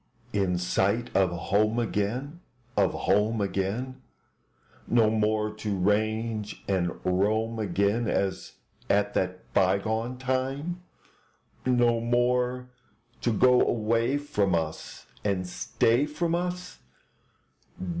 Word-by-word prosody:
In 95 -3 +1
sight 100 +6 0
of 95 -2 +4
home 105 +6 +1
again, 120 +7 -2 0.4
Of 100 -3 +3
home 110 +2 +2
again; 105 +7 -2 0.9
No 115 -2 +4
more 105 0 +1
to 105 -2 -2
range 110 +2 -1
and 90 -3 0
roam 110 +5 +1
again 100 +3 +1
As 95 -1 -1 0.4
at 105 0 +2
that 90 0 -3
bygone 110 +6 +1
time? 135 +7 -2 0.9
No 120 -2 +3
more 125 +1 0 0.5
to 120 - +1
go 125 +3 +5
away 115 +4 +1
from 105 -11 0
us 80 -1 -4 0.2
And 95 -3 0
stay 115 - +1
from 165 +3 -1
us? 180 +1 -3
110 Hz, 105 wpm, -27 LUFS, 100-125 Hz, 0.9 s, go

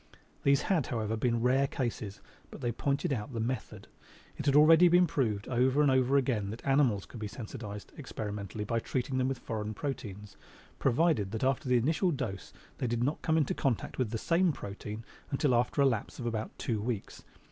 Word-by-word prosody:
These 140 0 +3
had, 175 -8 +1
however, 110 -2 -1
been 115 +1 0
rare 135 +2 +3
cases, 115 -7 -4 0.3
but - - -10
they 120 -2 0
pointed 140 +6 0
out 125 +2 -4
the 115 - -3
method. 125 +3 -4 0.5
It 150 - -5
had 140 - +4
already 160 +4 +8
been 175 +1 +6
proved 110 -11 -1
over 130 +3 +2
and 140 - +4
over 130 +1 +3
again 120 -7 0
that 110 +3 -8
animals 135 - +3
could 115 - -10
be 105 - -3
sensitized 105 -2 -7
experimentally 105 - -5
by 115 +3 0
treating 130 +2 -2
them 130 - +2
with 135 -1 -1
foreign 110 -2 -4
proteins, 105 -7 -6 0.4
provided 135 - +2
that 110 - -2
after 135 0 +1
the 125 - +5
initial 160 - +2
dose 120 - -4 0.3
they 125 - 0
did 120 0 0
not 145 +5 -1
come 160 0 +2
into 150 -4 +2
contact 130 -2 -1
with 125 -4 +1
the 115 - -2
same 170 +8 +2
protein 105 -2 -7 0.2
until 135 -1 +1
after 125 +4 +2
a - - +5
lapse 115 -6 0
of 120 - -5
about 110 -2 -2
two 110 -4 -2
weeks. 110 -2 -4
125 Hz, 195 wpm, -31 LUFS, 110-140 Hz, 0.5 s, already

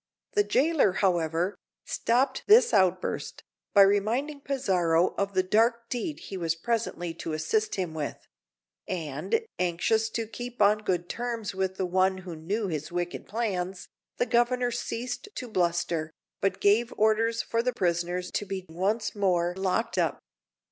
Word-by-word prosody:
The 415 - +4
jailer, 300 - +3
however, 175 -1 +1 0.3
stopped 260 +3 +1
this 430 - +7
outburst 185 -3 +1 0.3
by 200 - +8
reminding 230 +9 +1
Pizarro 180 -12 +1
of 200 -1 -2
the 185 - +3
dark 230 +4 +2
deed 295 +5 -3
he 195 - -6
was 165 -2 0
presently 175 -3 -2
to 165 -1 -5
assist 215 +8 0
him 180 -5 -2
with; 150 -2 -3 0.7
and, 175 - -2
anxious 180 +6 +1
to 225 0 -2
keep 245 +2 -8
on 210 +1 +5
good 180 -4 -1
terms 235 -2 -3
with 190 0 -2
one 185 +1 +2
who 175 -3 -6
knew 195 +7 -2
his 155 -3 -4
wicked 175 0 -3
plans, 190 -4 -3 0.3
the - - +2
Governor 245 0 +2
ceased 245 - -4
to 250 - -5
bluster, 170 -5 0 0.3
but 195 - 0
gave 220 +4 +3
orders 225 +2 +2
for 230 - 0
the 250 +1 0
prisoners 175 -3 -1
to 205 - -2
be 190 -1 -4
once 205 +6 -1
more 180 -3 +1
locked 190 +4 0
up. - - +1
200 Hz, 150 wpm, -28 LUFS, 175-230 Hz, 0.7 s, by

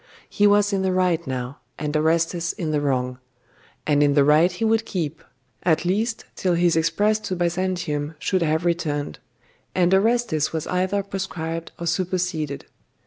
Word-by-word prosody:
He 205 -1 +3
was 205 0 +3
in 195 - +1
the 190 -1 +1
right 180 -3 +1
now, 130 +1 -4 0.2
and 150 0 -3
Orestes 165 +2 +1
in 160 -4 -3
the 150 -1 +1
wrong; 125 -3 -1 0.7
and 145 -1 +3
in 145 -1 +3
the 145 - +5
right 155 +5 +5
he 180 +6 -2
would 225 0 +2
keep 165 -7 -4 0.4
at 170 0 +1
least 220 +5 -1
till 180 -2 0
his 175 -1 +3
express 205 +7 +2
to 190 - -4
Byzantium 175 -4 -1
should 185 +4 0
have 160 +1 +1
returned, 150 - -1 0.6
and 180 0 +3
Orestes 215 -6 +2
was 160 -2 -3
either 185 +2 0
proscribed 165 -4 -4
or 170 - -5
superseded. 170 -4 -2
170 Hz, 160 wpm, -23 LUFS, 155-185 Hz, 0.7 s, the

